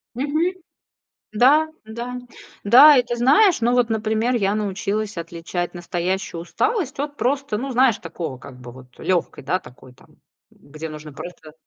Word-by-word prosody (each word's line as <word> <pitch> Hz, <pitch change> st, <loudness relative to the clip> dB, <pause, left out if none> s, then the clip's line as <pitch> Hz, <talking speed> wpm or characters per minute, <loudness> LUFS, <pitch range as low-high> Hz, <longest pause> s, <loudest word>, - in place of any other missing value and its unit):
Мгм. 310 Hz, +7 st, 0 dB, 0.8 s
Да, 295 Hz, +8 st, +5 dB, 0.2 s
да, 240 Hz, +3 st, -6 dB, 0.5 s
да. 265 Hz, +6 st, +8 dB
И -, -, +4 dB
ты 240 Hz, 0 st, -4 dB
знаешь, 290 Hz, -, +4 dB
ну, 240 Hz, -, +3 dB
вот, 245 Hz, -2 st, +2 dB
например, 220 Hz, +2 st, 0 dB
я 200 Hz, -3 st, +1 dB
научилась 210 Hz, +1 st, -2 dB
отличать 170 Hz, +1 st, -5 dB
настоящую 175 Hz, 0 st, -3 dB
усталость 355 Hz, -, -2 dB
от 290 Hz, 0 st, -4 dB
просто, 275 Hz, -3 st, -1 dB
ну, 265 Hz, +4 st, -4 dB
знаешь, 250 Hz, -3 st, +4 dB
такого 165 Hz, -5 st, -6 dB
как 130 Hz, -1 st, -13 dB
бы 120 Hz, -1 st, -10 dB
вот 125 Hz, 0 st, -16 dB
лёгкой, 175 Hz, -4 st, -1 dB
да, 180 Hz, +8 st, 0 dB
такой 125 Hz, -3 st, -16 dB
там, -, -, -23 dB, 0.3 s
где 155 Hz, +2 st, -10 dB
нужно 150 Hz, -1 st, -9 dB
просто 160 Hz, -2 st, -10 dB
215 Hz, 155 wpm, -22 LUFS, 170-255 Hz, 0.8 s, да